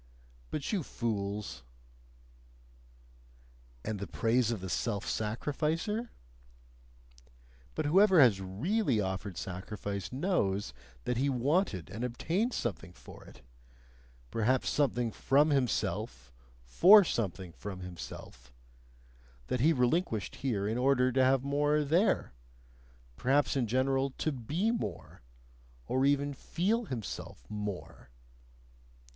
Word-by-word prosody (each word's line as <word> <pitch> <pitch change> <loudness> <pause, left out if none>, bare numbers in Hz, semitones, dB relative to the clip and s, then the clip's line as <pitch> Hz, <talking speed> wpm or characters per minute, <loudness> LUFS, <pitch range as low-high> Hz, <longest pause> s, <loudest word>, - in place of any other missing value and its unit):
But 150 - -3
you 195 - +1
fools! 105 - -3 2.2
"And 110 -2 -3
the 100 - -5
praise 115 +1 +1
of 115 -3 -1
the 95 - -6
self 100 +3 -2
sacrificer?" 155 - -2 1.7
But - - -1
whoever 190 +4 +5
has 115 -9 +6
really 130 - 0
offered 95 -1 -3
sacrifice 100 +1 -5
knows 125 - 0 0.3
that 125 - -1
he 140 +3 +1
wanted 135 - 0
and 110 +4 -5
obtained 165 - -1
something 95 -5 -4
for - - -14
it - - -15 0.9
perhaps 120 +3 +1
something 125 -5 +1
from 145 +7 +3
himself 65 - -1 0.3
for 190 - +7
something 95 - -3
from 95 +1 -8
himself; 85 -8 -9 1.0
that 125 - 0
he 150 +7 +5
relinquished 125 - 0
here 110 -7 -1
in 115 +3 -1
order 130 -1 +3
to 130 +1 +3
have 130 0 +3
more 145 +2 +2
there, 165 - +2 0.8
perhaps 140 +2 +2
in 125 -4 +1
general 135 +3 +1
to 155 - 0
be 150 - -1
more, 105 - -5 0.6
or 130 - +2
even 145 0 +1
feel 205 - -1
himself 110 - -6
"more." 105 -10 -6
125 Hz, 110 wpm, -31 LUFS, 100-145 Hz, 2.2 s, for